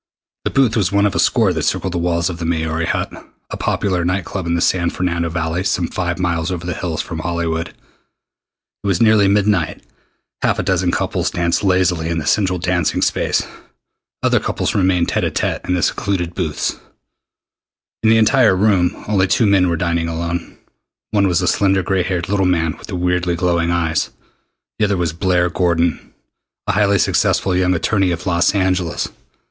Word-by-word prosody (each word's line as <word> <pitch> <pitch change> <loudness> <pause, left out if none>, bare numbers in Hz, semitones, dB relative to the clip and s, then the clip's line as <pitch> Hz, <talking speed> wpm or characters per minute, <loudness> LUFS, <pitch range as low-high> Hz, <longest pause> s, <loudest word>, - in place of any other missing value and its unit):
The - - +1
booth 135 -5 +2
was 100 -5 +1
one 100 0 +3
of 100 - +1
a - - -1
score - - +3
that - - -2
circled 95 - -1
the 90 - -1
walls 85 0 0
of 85 - -8
the 85 - -3
"Maori 80 0 -1
Hut," - - -1 0.4
a - - -3
popular 95 -4 -1
night 90 +1 -1
club 95 -4 -5
in 85 - +1
the - - 0
San 85 0 +1
Fernando 85 -2 -2
Valley 80 +2 -2
some 90 -3 0
five 85 -2 -3
miles 85 -1 -1
over 85 -1 -4
the 90 - -2
hills 80 -3 -3
from 80 -3 -6
Hollywood. 85 0 -2
It 100 - -17
was 95 -4 +1
nearly 110 -3 +5
midnight. 100 -4 +1 0.6
Half - - +1
a - - -1
dozen - - +1
couples - - -1
danced 85 +2 0
lazily 90 -4 +1
in 85 - -1
the 80 - -3
central 95 +2 +1
dancing 90 -2 0
space. - - 0 0.8
Other - - +3
couples - - -2
remained 90 -3 +2
tête - - 0
à - - 0
tête - - -2
in 90 - +2
the 90 - -1
secluded 90 -4 -1
booths. 85 -5 -2 1.2
In 110 - +3
the 115 - +5
entire 110 -1 +4
room 95 -3 +1
only 100 -2 +2
two 110 +5 +2
men 95 -3 +3
were 85 - 0
dining 85 -1 -1
alone. 85 +1 -4 0.5
One 100 -2 +3
was 90 -3 +1
the - - 0
slender 95 -1 +2
gray 95 +1 0
haired 90 -1 -2
little 95 -2 +1
man 80 -3 +1
with - - -13
the 100 - -5
weirdly 90 0 0
glowing 85 -1 0
eyes. 85 -2 0 0.7
The 110 - +3
other 100 -2 0
was 85 -3 -1
Blair 90 0 +1
Gordon, 85 -3 0 0.5
a - - +1
highly 100 0 +2
successful 95 0 +1
young 90 0 +2
attorney 95 +2 +1
of 85 -2 -3
Los 90 +2 +2
Angeles. 95 -3 0
90 Hz, 190 wpm, -18 LUFS, 85-95 Hz, 1.2 s, nearly